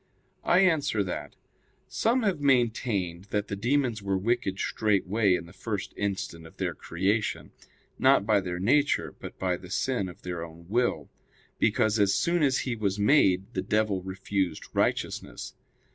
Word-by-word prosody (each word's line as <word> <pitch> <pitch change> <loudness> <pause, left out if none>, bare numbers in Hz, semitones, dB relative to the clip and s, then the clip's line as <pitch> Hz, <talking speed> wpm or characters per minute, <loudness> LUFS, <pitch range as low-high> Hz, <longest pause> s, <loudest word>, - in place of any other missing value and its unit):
I 180 +2 +4
answer 145 - +2
that, 95 - -5 0.5
Some 240 +2 +1
have 190 -8 0
maintained 115 -9 +1
that 105 0 -2
the 100 - -2
demons 120 +1 0
were 100 -1 0
wicked 110 -1 0
straightway 100 -1 +1
in 85 -1 -4
the 85 - -14
first 100 0 -4
instant 95 -5 -3
of - - -18
their - - -1
creation; 100 +5 -1 0.5
not 130 -6 +5
by 105 -2 +3
their 90 -2 -4
nature, 140 +10 +2
but - - -9
by 90 -1 0
the 90 - -12
sin 100 0 -1
of 90 - -14
their 90 -2 -4
own 85 0 -11
will; 120 +3 0 0.5
because, 110 0 +2
as 100 -1 +3
soon 170 +11 +1
as 135 -3 +3
he 125 -3 -2
was 100 -3 -1
made, 100 -3 +3
the 95 - -1
devil 105 -1 0
refused 95 -2 -2
righteousness. - - -1
100 Hz, 160 wpm, -28 LUFS, 95-120 Hz, 0.5 s, not